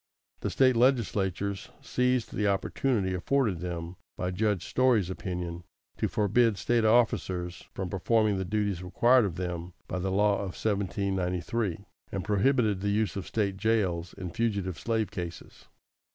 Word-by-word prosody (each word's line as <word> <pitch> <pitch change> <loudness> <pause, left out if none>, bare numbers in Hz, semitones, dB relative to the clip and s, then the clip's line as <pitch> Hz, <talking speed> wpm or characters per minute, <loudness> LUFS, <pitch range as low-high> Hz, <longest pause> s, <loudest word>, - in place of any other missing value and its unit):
The - - -2
State 130 -2 +4
legislatures 100 -6 +1
seized 125 -1 0
the 105 - 0
opportunity 100 +1 0
afforded 105 0 +1
them 85 0 -5 0.2
by 90 0 -2
Judge 100 -1 0
Story's 120 -8 +2
opinion, 90 -2 -4 0.3
to - - +1
forbid 110 +1 +2
State 120 +1 +1
officers 95 -6 +1
from 95 - -3
performing 105 +2 +1
the - - -1
duties 100 -1 -1
required 120 +7 +4
of 90 -5 -3
them 90 -1 -4
by 90 - -3
the 95 +2 -1
law 100 +1 +3
of 95 -3 -5
1793, 100 -1 -1 0.3
and 95 -2 -3
prohibited 105 -1 +2
the 100 - 0
use 105 -3 0
of 95 -3 -5
State 100 -3 -1
jails 95 -5 0
in 90 -2 -6
fugitive 100 -6 -1
slave 110 -4 -1
cases. 90 -5 -7
100 Hz, 145 wpm, -29 LUFS, 90-110 Hz, 0.3 s, State